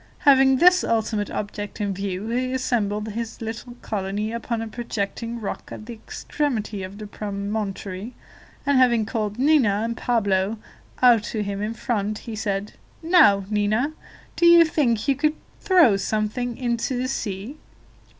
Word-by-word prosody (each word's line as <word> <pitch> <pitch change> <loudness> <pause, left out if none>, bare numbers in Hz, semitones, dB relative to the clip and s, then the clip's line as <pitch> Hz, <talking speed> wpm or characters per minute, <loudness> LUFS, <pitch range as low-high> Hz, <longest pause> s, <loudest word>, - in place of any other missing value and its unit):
Having 265 -1 +6
this 360 +4 +6
ultimate 220 -2 0
object 205 +1 -5
in 205 -2 -1
view, 195 +2 -4
he 255 +2 -1
assembled 215 -5 -1
his 225 +1 -5
little 225 +2 -6
colony 205 +1 -2
upon 235 0 -3
a 225 - -4
projecting 230 0 -4
rock 210 - -6
at 215 - -8
the 240 - -7
extremity 220 -2 -3
of 190 +2 -7
the 215 - -7
promontory, 205 +1 -5 0.5
and 280 -2 +3
having 240 -4 +4
called 215 -2 -3
Nina 275 -3 +4
and 230 0 -2
Pablo 205 -3 0 0.5
out 240 -3 +7
to 215 -2 -2
him 200 0 -4
in 215 +2 -3
front, 215 -3 -2
he 225 0 -7
said: 205 -1 -3 0.3
"Now, 315 - +5
Nina, 215 +8 +1 0.4
do 345 - +4
you 340 0 +8
think 235 -9 0
you 280 - +4
could 300 +3 +1 0.2
throw 340 - +5
something 220 +4 -2
into 245 +1 -1
the 255 +1 -1
sea?" 225 +2 -4
225 Hz, 150 wpm, -23 LUFS, 205-250 Hz, 0.5 s, you